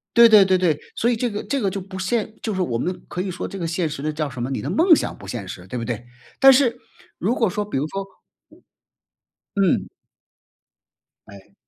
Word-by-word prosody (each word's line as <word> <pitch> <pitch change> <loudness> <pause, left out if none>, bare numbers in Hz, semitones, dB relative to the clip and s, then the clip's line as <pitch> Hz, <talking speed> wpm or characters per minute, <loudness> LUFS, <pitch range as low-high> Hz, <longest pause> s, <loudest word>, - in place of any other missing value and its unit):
对 235 0 +9
对 215 -3 +8
对 185 -1 +3
对。 165 -5 +1 0.2
所 235 - +1
以 240 - +2
这 240 +2 -1
个 205 0 -4
这 280 - -1
个 200 - +1
就 195 +1 -4
不 190 0 -9
现 220 +3 -1
就 220 - -2
是 190 - -1
我 125 -10 -1
们 180 +9 -4
可 180 - -4
以 190 -1 -3
说 175 - -5
这 195 - -7
个 170 - -3
现 165 -1 -1
实 145 -2 -6
呢 155 - -1
叫 150 -1 -3
什 125 - -7
么， 125 - -2
你 135 - -3
的 140 - -4
梦 325 - +5
想 - - -3
不 100 - -12
现 100 -1 -5
实， 90 -1 -8
对 125 - -5
不 115 - -4
对？ 120 -1 -4 0.3
但 270 0 +9
是， 255 -3 +3 0.4
如 225 +8 0
果 225 -5 +2
说 210 +2 -2
比 205 - -3
如 145 +3 -1
说 195 +3 -4 1.6
嗯。 190 - +2 1.4
哎。 100 -1 -15
185 Hz, 245 characters per minute, -22 LUFS, 145-220 Hz, 1.6 s, 对